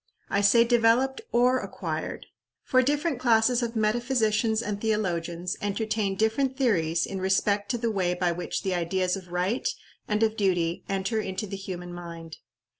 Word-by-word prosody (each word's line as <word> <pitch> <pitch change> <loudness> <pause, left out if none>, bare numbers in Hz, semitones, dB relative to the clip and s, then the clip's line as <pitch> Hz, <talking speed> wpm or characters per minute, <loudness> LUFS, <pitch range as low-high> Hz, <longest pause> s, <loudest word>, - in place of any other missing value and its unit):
I 200 - +2
say 205 +4 +6
developed 240 - +3
or 250 +2 +3
acquired - - -5 0.4
for 255 - +3
different 290 +1 0
classes 240 0 +3
of 235 0 -3
metaphysicians 220 0 +1
and 205 -1 -4
theologians 180 -4 -1
entertain 205 -1 -1
different 250 +6 0
theories 170 - +1
in 195 -1 -5
respect 200 +2 +1
to 245 - 0
the 230 -1 -1
way 180 -3 0
by 180 -1 +1
which 175 +1 -4
the 190 - 0
ideas 180 +1 0
of 190 -2 -9
right 185 +8 0 0.4
and 210 +1 +1
of 220 0 +2
duty 175 -4 0
enter 195 +3 -1
into 190 +1 -4
the 195 -1 -6
human 180 -2 -6
mind. 170 -2 -8
210 Hz, 160 wpm, -27 LUFS, 180-235 Hz, 0.4 s, say